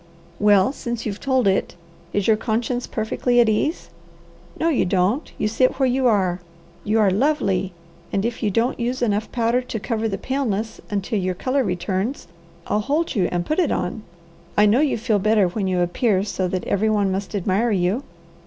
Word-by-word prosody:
"Well 205 Hz, +1 st, +4 dB
since 235 Hz, -4 st, -5 dB
you've 205 Hz, -2 st, -3 dB
told 260 Hz, -4 st, +1 dB
it, 190 Hz, -2 st, +1 dB, 0.4 s
is 205 Hz, -2 st, 0 dB
your 220 Hz, -, +5 dB
conscience 235 Hz, +3 st, -2 dB
perfectly 240 Hz, +2 st, 0 dB
at 235 Hz, -, +5 dB
ease? 220 Hz, +10 st, -1 dB, 0.7 s
No 325 Hz, -, +1 dB
you 315 Hz, -6 st, +2 dB
don't! 195 Hz, -, 0 dB
You -, -, 0 dB
sit 255 Hz, +4 st, +1 dB
where 265 Hz, -1 st, +2 dB
you 255 Hz, +1 st, +2 dB
are! 190 Hz, -5 st, +2 dB, 0.4 s
You 215 Hz, +2 st, +1 dB
are 205 Hz, -3 st, +4 dB
lovely, 195 Hz, -6 st, +1 dB, 0.4 s
and 200 Hz, +2 st, 0 dB
if 235 Hz, -, -3 dB
you 215 Hz, -, +1 dB
don't 230 Hz, +7 st, 0 dB
use 245 Hz, +2 st, -1 dB
enough 210 Hz, -1 st, 0 dB
powder 235 Hz, +1 st, +1 dB
to 245 Hz, -3 st, -5 dB
cover 225 Hz, +1 st, -2 dB
the 195 Hz, -3 st, -2 dB
paleness, 230 Hz, -5 st, -2 dB
until 205 Hz, +1 st, -1 dB
your 185 Hz, -1 st, -1 dB
colour 260 Hz, +7 st, 0 dB
returns, 190 Hz, +4 st, -2 dB, 0.4 s
I'll 210 Hz, -, 0 dB
hold 295 Hz, +9 st, 0 dB
you 195 Hz, -8 st, +1 dB
and 175 Hz, -1 st, -1 dB
put 310 Hz, -, 0 dB
it 350 Hz, -, +2 dB
on. 180 Hz, +5 st, -2 dB, 0.6 s
I 210 Hz, -, +6 dB
know 210 Hz, +5 st, +4 dB
you 295 Hz, -4 st, +2 dB
feel 220 Hz, -2 st, +1 dB
better 210 Hz, -1 st, +3 dB
when 195 Hz, +1 st, -2 dB
you 180 Hz, -1 st, +1 dB
appear 190 Hz, +3 st, +1 dB
so 190 Hz, -2 st, -2 dB
that 185 Hz, 0 st, -3 dB
every 215 Hz, +2 st, +1 dB
one 205 Hz, -3 st, +1 dB
must 195 Hz, +2 st, -3 dB
admire 200 Hz, +4 st, +1 dB
you." 195 Hz, +3 st, +1 dB
215 Hz, 190 wpm, -22 LUFS, 195-245 Hz, 0.7 s, I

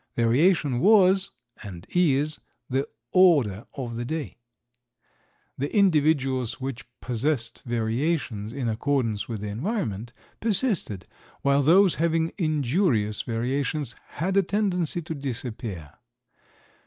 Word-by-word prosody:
Variation 135 Hz, +3 st, +3 dB
was, 195 Hz, -, +5 dB, 0.3 s
and 90 Hz, -5 st, -9 dB
is, 155 Hz, -4 st, +2 dB, 0.3 s
the 135 Hz, +2 st, -1 dB, 0.2 s
order 140 Hz, -, +4 dB
of 120 Hz, -4 st, -5 dB
the 120 Hz, -, -3 dB
day. 155 Hz, +2 st, -4 dB, 1.2 s
The 140 Hz, +2 st, -2 dB
individuals 145 Hz, -, +2 dB
which 130 Hz, -3 st, -5 dB
possessed 120 Hz, -1 st, -2 dB
variations 115 Hz, -1 st, -1 dB
in 130 Hz, -1 st, -3 dB
accordance 115 Hz, -2 st, -1 dB
with 110 Hz, -4 st, -5 dB
the 105 Hz, -, -4 dB
environment 115 Hz, -, -3 dB, 0.3 s
persisted, 200 Hz, -, 0 dB, 0.4 s
while 140 Hz, 0 st, +3 dB
those 180 Hz, +6 st, +5 dB
having 165 Hz, 0 st, +1 dB
injurious 145 Hz, -, +1 dB
variations 130 Hz, +4 st, -2 dB, 0.2 s
had 185 Hz, +5 st, -1 dB
a -, -, +7 dB
tendency 180 Hz, -4 st, -1 dB
to 160 Hz, -, -5 dB
disappear. 115 Hz, -, -5 dB
140 Hz, 105 wpm, -25 LUFS, 115-170 Hz, 1.2 s, a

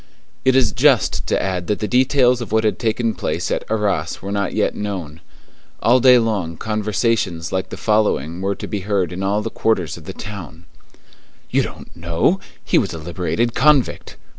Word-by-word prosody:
It 130 Hz, -1 st, +3 dB
is 125 Hz, -5 st, +4 dB
just 130 Hz, +1 st, +2 dB
to -, -, +1 dB
add 90 Hz, -2 st, -2 dB
that 105 Hz, -, 0 dB
the 105 Hz, -, -3 dB
details 125 Hz, 0 st, +3 dB
of 115 Hz, -, -6 dB
what 110 Hz, 0 st, +2 dB
had 110 Hz, -, 0 dB
taken 115 Hz, 0 st, 0 dB
place -, -, -3 dB
at -, -, -1 dB
Arras 100 Hz, -7 st, -1 dB
were 100 Hz, -, -6 dB
not 100 Hz, 0 st, -1 dB
yet 105 Hz, -, +1 dB
known. 90 Hz, -7 st, -5 dB, 0.6 s
All 125 Hz, +3 st, +4 dB
day 125 Hz, 0 st, +7 dB
long 100 Hz, -8 st, -1 dB
conversations 105 Hz, -5 st, -1 dB
like 95 Hz, 0 st, -2 dB
the -, -, -7 dB
following 95 Hz, -7 st, 0 dB
were 100 Hz, +1 st, -1 dB
to -, -, -7 dB
be 105 Hz, -, -3 dB
heard 95 Hz, -3 st, -1 dB
in 90 Hz, -, -5 dB
all 100 Hz, +2 st, 0 dB
quarters 95 Hz, -9 st, -1 dB
of 80 Hz, -, -13 dB
the 95 Hz, -, -6 dB
town:— 90 Hz, -6 st, -9 dB, 0.9 s
"You -, -, +3 dB
don't -, -, -8 dB
know? 85 Hz, -, +1 dB, 0.3 s
He -, -, +3 dB
was -, -, -2 dB
a -, -, -5 dB
liberated 90 Hz, +8 st, -2 dB
convict!" 140 Hz, 0 st, +2 dB
105 Hz, 185 wpm, -20 LUFS, 90-115 Hz, 0.9 s, day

